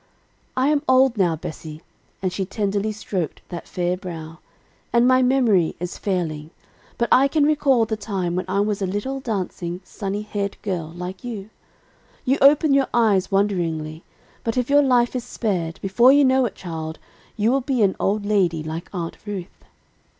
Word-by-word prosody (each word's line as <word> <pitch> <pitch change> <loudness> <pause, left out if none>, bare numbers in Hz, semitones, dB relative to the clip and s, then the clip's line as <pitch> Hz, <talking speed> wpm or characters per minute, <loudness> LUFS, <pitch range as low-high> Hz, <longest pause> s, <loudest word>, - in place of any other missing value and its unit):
"I 260 +2 +3
am 300 -1 +2
old 260 -1 +5
now, 180 -6 +2
Bessie," 155 0 -8 0.4
and 185 -1 0
she 195 - -1
tenderly 200 +2 -1
stroked 190 -6 -4
that 175 -2 -7
fair 180 0 -1
brow, 165 -3 -8 0.5
"and 235 +1 +4
my 255 0 +5
memory 245 -10 +3
is 180 +1 -5
failing. 160 -6 -2 0.5
But 235 - +1
I 270 +2 +6
can 300 +1 +1
recall 280 -6 +3
the 220 0 -2
time 190 -4 -2
when 185 0 -1
I 195 +2 +1
was 205 -1 -1
a 190 - 0
little 205 +8 -3
dancing, 185 -7 -3
sunny 200 +2 -4
haired 200 -1 -3
girl, 180 -6 -2
like 180 +2 -7
you. 220 -4 -6 0.7
You 265 +2 +2
open 290 +1 +6
your 275 -1 +3
eyes 210 -5 +3
wonderingly, 170 -6 -1 0.4
but, 230 +1 -2
if 250 +2 0
your 290 0 +6
life 250 -3 +2
is 250 - -2
spared, 185 -9 -2
before 215 +7 +5
you 285 0 +5
know 260 0 +4
it, - - -9
child, 160 -3 -6 0.4
you 220 +2 +2
will 270 +1 +2
be 255 -3 +1
an 190 -2 +2
old 205 +1 0
lady 180 -6 +1
like 160 +2 -6
Aunt 170 -3 -4
Ruth. 195 -3 -7
200 Hz, 175 wpm, -22 LUFS, 175-245 Hz, 0.7 s, I